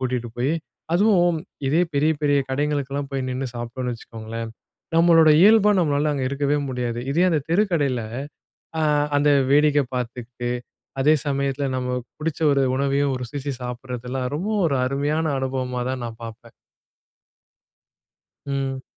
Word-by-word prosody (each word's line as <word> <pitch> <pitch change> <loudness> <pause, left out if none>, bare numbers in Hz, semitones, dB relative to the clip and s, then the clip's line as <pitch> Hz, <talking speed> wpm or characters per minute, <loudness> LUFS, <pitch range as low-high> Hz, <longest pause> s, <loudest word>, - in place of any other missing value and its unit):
கூட்டிட்டு 125 -2 -2
போய், 130 +5 +1 0.4
அதுவும் 175 -4 +3 0.3
இதே 160 +6 +3
பெரிய, 150 +3 +3
பெரிய 145 -1 +3
கடைகளுக்கெல்லாம் 140 0 -1
போய் 135 -1 -2
நின்னு 130 +1 -3
சாப்பிட்டோன்னு 120 +1 -4
வச்சுக்கோங்களேன், 115 0 -7 0.5
நம்மளோட 165 -1 +6
இயல்பா 210 0 +6
நம்மளால 150 -2 +1
அங்க 135 -2 -2
இருக்கவே 145 +1 0
முடியாது. 120 -2 -2
இதே 175 +4 +3
அந்த 155 -3 +2
தெருக்கடையில 165 - +1 0.8
ஆ - - +1 0.4
அந்த 145 +1 +3 0.2
வேடிக்க 150 0 +5
பாத்துக்குட்டு, 120 0 -4 0.5
அதே 150 +3 +5
சமயத்தில 140 0 -1
நம்ம 125 0 -2 0.2
புடிச்ச 160 +1 -3
ஒரு 140 -1 +2
உணவையும் 140 0 +1
ஒரு 125 - -4
ருசிச்சு 140 +3 -4
சாப்பிடுறதெல்லாம் 125 +1 -4
ரொம்ப 185 +7 -3 0.2
ஒரு 140 -4 +1
அருமையான 145 +4 0
அனுபவமா 130 -1 -2
தான் 130 -1 -4
நான் 115 0 -7
பாப்பேன். 115 0 -11 1.9
ம். 135 -1 -3
135 Hz, 130 wpm, -23 LUFS, 125-150 Hz, 1.9 s, நம்மளோட